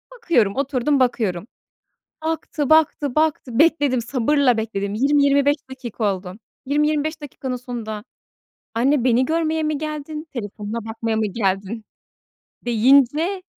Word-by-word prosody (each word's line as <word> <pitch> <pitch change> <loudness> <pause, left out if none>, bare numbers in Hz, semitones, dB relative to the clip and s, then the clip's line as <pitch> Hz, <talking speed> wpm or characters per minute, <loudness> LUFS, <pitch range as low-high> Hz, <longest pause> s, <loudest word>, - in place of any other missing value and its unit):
bakıyorum, 285 - +1
oturdum 275 0 +1
bakıyorum. 220 -6 0 0.8
Baktı, 320 -2 -2
baktı, 305 -4 +3
baktı, 300 -6 0
bekledim 290 -6 +3
sabırla 255 +1 +2
bekledim, 200 -2 -3
20-25 280 +3 +3
dakika 235 -6 -2
oldu. 185 -1 -9 0.3
20-25 300 +2 0
dakikanın 265 -3 -5
sonunda, 230 -4 -6 0.7
"Anne 255 +2 +2
beni 250 +1 +3
görmeye 320 +1 0
mi 305 -1 -1
geldin, 305 +1 -5
telefonuna 215 -1 -5
bakmaya 225 0 -3
mı 220 - +1
geldin?" 200 +1 -2 0.8
deyince 275 - +3
260 Hz, 110 wpm, -21 LUFS, 225-300 Hz, 0.8 s, baktı